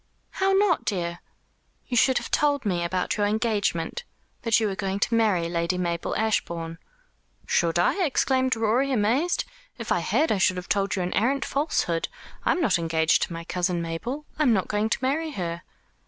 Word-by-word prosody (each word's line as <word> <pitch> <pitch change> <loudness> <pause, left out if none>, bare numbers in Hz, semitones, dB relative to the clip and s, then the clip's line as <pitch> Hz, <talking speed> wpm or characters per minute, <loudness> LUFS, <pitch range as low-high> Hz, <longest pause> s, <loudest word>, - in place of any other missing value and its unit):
"How 385 0 +1
not, 385 -3 +3
dear?" 170 -4 -2 0.7
"You 250 - -4
should 260 +2 +4
have - - -4
told 285 -3 +2
me 175 -4 0
about 180 +4 -1
your 205 -1 +2
engagement 215 - -1 0.4
that 230 -1 +3
you 220 - 0
were 200 -2 -1
going 195 0 -2
to 230 - 0
marry 210 -7 +2
Lady 170 +1 -1
Mabel 170 -2 -2
Ashbourne." 170 -6 -1 0.7
"Should 170 0 +1
I?" 270 - +2
exclaimed 260 -4 +1
Rorie, 230 +5 +1
amazed. 255 +9 +1 0.3
"If - - -6
I - - +3
had 315 - +1
I 210 - +1
should 185 -1 +3
have 180 - -7
told 200 -1 +1
you 185 - -1
an 180 - -3
arrant 270 +6 +1
falsehood. 275 - 0 0.4
I - - +2
am 360 - 0
not 210 - +2
engaged 160 -1 +2
to - - -1
my 165 0 -6
cousin 175 0 -1
Mabel. 200 - -4
I - - +1
am 255 -6 +4
not 190 -4 0
going 210 +1 0
to - - +1
marry 305 +4 0
her." 170 -5 -4
205 Hz, 190 wpm, -25 LUFS, 175-260 Hz, 0.7 s, should